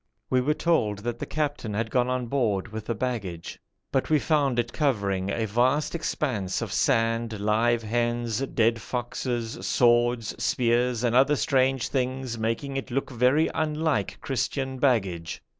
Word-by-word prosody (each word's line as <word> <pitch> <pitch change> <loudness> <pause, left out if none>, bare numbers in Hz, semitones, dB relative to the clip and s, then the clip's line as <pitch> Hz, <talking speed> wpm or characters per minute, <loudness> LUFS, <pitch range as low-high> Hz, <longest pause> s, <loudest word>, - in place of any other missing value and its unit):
We 130 -1 +3
were 150 +4 +1
told 140 -11 +1
that 120 0 -3
the - - -4
captain 145 -8 -2
had 110 +1 -2
gone 125 -1 +2
on 125 -1 -1
board 115 -6 0
with 110 0 -7
the 115 - -1
baggage, 100 -8 -4 0.3
but 135 - 0
we 155 - +5
found 145 -4 +1
it 120 0 -1
covering 100 - 0
a 110 +2 -1
vast 125 +7 +1
expanse 130 - -2
of - - -4
sand, 115 -1 +1
live 115 +3 +2
hens, 120 0 -1
dead 115 -4 +1
foxes, 120 -1 -3
swords, 120 -2 +3
spears, 120 0 +1
and 120 -1 +1
other 135 +3 +5
strange 130 0 +1
things 130 -2 -2
making 115 +5 -2
it 135 - -4
look 135 +2 -2
very 130 +6 +3
unlike 150 -10 -1
Christian 130 0 -2
baggage. 95 -11 0
120 Hz, 155 wpm, -26 LUFS, 110-135 Hz, 0.3 s, we